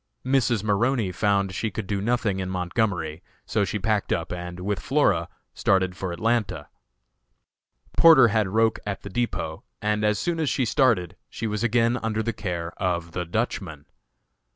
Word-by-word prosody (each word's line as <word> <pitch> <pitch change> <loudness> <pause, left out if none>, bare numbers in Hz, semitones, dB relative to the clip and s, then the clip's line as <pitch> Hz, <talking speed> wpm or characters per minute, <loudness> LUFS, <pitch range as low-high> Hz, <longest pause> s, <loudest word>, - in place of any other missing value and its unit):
Mrs. 125 -5 +2
Maroney 110 0 +1
found 100 -1 +1
she 110 +4 -2
could 105 +1 -5
do 100 0 -2
nothing 110 -3 0
in 95 -1 -3
Montgomery, 90 -3 -1 0.2
so 105 - +1
she 100 +2 -2
packed 105 0 0
up 85 -2 -1
and, 90 0 -6
with 100 +1 -1
Flora, - - +1 0.2
started 95 -2 +1
for 95 -1 -4
Atlanta. 115 +5 -1 1.3
Porter 155 -8 +8
had 105 -1 +1
Roch 110 +3 +2
at 105 -1 -5
the 100 - -7
depot, 90 -8 -2 0.2
and 105 0 0
as 105 -1 +2
soon 170 - -1
as 155 -3 +1
she 130 - +1
started, 110 - +2
she 115 - -5
was 105 0 -2
again 120 +1 +2
under 110 -1 -1
the 115 +1 -1
care 90 -5 -4
of 85 -2 -1
the 90 +1 -3
Dutchman. 80 -3 -3
105 Hz, 165 wpm, -25 LUFS, 90-115 Hz, 1.3 s, Porter